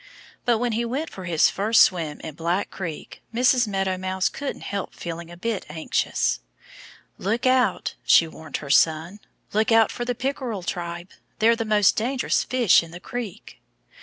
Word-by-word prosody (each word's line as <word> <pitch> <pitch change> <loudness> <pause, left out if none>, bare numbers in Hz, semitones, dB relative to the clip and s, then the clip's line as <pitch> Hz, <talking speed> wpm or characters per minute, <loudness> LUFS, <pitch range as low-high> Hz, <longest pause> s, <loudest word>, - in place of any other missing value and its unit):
But 240 -2 +3
when 245 +1 -1
he 225 +2 0
went 270 +7 -3
for 185 - -8
his 165 -3 +3
first 215 +3 +2
swim 160 -5 0
in 160 - -7
Black 170 +5 -1
Creek 165 -5 -7
Mrs. 245 0 +3
Meadow 195 -2 -1
Mouse 185 0 0
couldn't 280 -1 -5
help 200 -1 -4
feeling 170 0 -6
a 175 - -11
bit 220 +2 -2
anxious. 160 +1 0 0.8
"Look 220 +6 -1
out!" 255 -6 +2
she 165 - +5
warned 160 -1 -7
her 140 -2 -5
son. 160 +6 +3 0.3
"Look 215 +2 +2
out 225 -1 +5
for 240 - -4
the 245 0 -2
Pickerel 250 -6 -3
tribe! 175 +1 -5 0.3
They're 230 +2 +4
the 225 -1 -3
most 210 -2 +4
dangerous 255 +4 0
fish 250 -6 +4
in 165 - -10
the 170 +2 -9
creek." 235 0 -7
200 Hz, 170 wpm, -24 LUFS, 170-235 Hz, 0.8 s, she